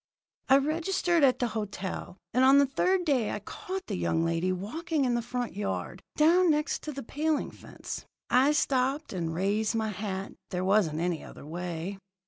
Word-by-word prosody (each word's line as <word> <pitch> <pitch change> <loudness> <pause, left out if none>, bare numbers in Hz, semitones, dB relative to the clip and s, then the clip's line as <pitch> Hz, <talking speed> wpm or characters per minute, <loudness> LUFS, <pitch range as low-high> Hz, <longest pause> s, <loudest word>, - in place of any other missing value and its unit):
"I 270 - +8
registered 335 +3 +1
at 255 -2 +5
the 245 -2 0
hotel, 205 -4 -5 0.2
and 255 - +4
on 270 +1 +7
the 280 - +6
third 360 +7 +1
day 255 -8 +2
I - - -2
caught 375 - -6
the 205 - -3
young 165 -2 +1
lady 165 +2 0
walking 285 - -1
in 245 - +1
the 240 - +1
front 245 -1 -4
yard, 205 0 -3
down 345 +4 +5
next 300 -1 +1
to 305 - -3
the 275 -1 -6
paling 300 +5 -1
fence. - - -8 0.2
I 260 +5 +4
stopped 275 0 +1
and 170 -3 -2
raised 205 +5 +1
my 220 -1 0
hat 195 -1 -4 0.2
there 180 -1 -2
wasn't 185 -6 +2
any 175 -2 -1
other - - -11
way. 175 +3 -5
240 Hz, 180 wpm, -29 LUFS, 190-300 Hz, 0.2 s, I